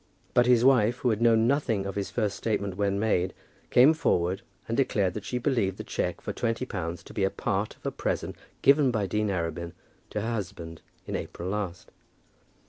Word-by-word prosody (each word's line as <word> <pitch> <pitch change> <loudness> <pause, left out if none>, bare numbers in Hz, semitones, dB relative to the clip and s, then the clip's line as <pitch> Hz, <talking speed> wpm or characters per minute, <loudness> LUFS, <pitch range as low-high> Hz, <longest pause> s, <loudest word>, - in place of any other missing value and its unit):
But 120 0 +4
his 125 -1 +5
wife, 120 -3 +4
who 125 -1 +1
had 110 +1 -1
known 115 -1 +5
nothing 115 -7 +1
of 100 - -3
his 100 -1 -3
first 105 -4 -1
statement 100 -4 -2
when 100 0 0
made, 95 -4 +1 0.3
came 130 +6 +7
forward 90 - +1 0.3
and 115 - -1
declared 100 -8 +1
that 105 - -6
she 125 - -2
believed 115 -7 0
the - - -5
cheque - - -2
for - - -4
twenty 115 +1 -1
pounds 85 -7 -4
to - - -12
be 100 - -1
a 95 - +3
part 100 +1 -2
of - - -26
a - - 0
present - - -2 0.3
given 140 -1 +6
by 110 -5 0
Dean 105 +3 0
Arabin 85 -2 -3 0.4
to 105 - -3
her 115 +3 -2
husband 90 -6 -6 0.2
in - - -4
April 90 +2 -5
last. 100 -1 -4
105 Hz, 200 wpm, -27 LUFS, 95-120 Hz, 0.4 s, came